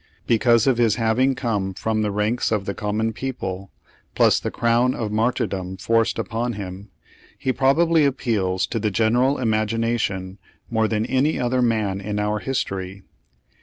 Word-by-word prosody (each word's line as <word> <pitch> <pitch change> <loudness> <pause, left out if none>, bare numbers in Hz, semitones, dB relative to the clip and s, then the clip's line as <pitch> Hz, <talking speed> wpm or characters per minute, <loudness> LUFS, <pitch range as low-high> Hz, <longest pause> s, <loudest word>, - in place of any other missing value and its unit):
Be 115 - +2
cause 115 -1 +4
of 130 -3 +2
his 115 -3 +3
having 120 +4 +2
come 105 -7 -2
from 110 +1 -1
the 105 - 0
ranks 105 +4 0
of 105 -3 0
the 100 - -2
common 110 +2 -2
people, 100 -7 -5 0.4
plus - - +4
the - - -3
crown 120 +2 +1
of 110 -3 -3
martyrdom 100 -4 -1
forced 115 +4 +1
upon 120 +1 -2
him, 100 0 -7 0.5
he 130 - -1
probably 160 +5 +3
appeals 110 -9 0
to 115 - -3
the 105 0 0
gen 110 +2 +1
eral 130 +3 +2
imagination 110 -4 -1 0.3
more 110 -1 +2
than 110 0 -1
any 135 +5 +1
other 125 +1 +1
man 110 -5 0
in 105 +1 -4
our 105 +1 0
history. 95 -6 -4
110 Hz, 165 wpm, -22 LUFS, 100-120 Hz, 0.5 s, cause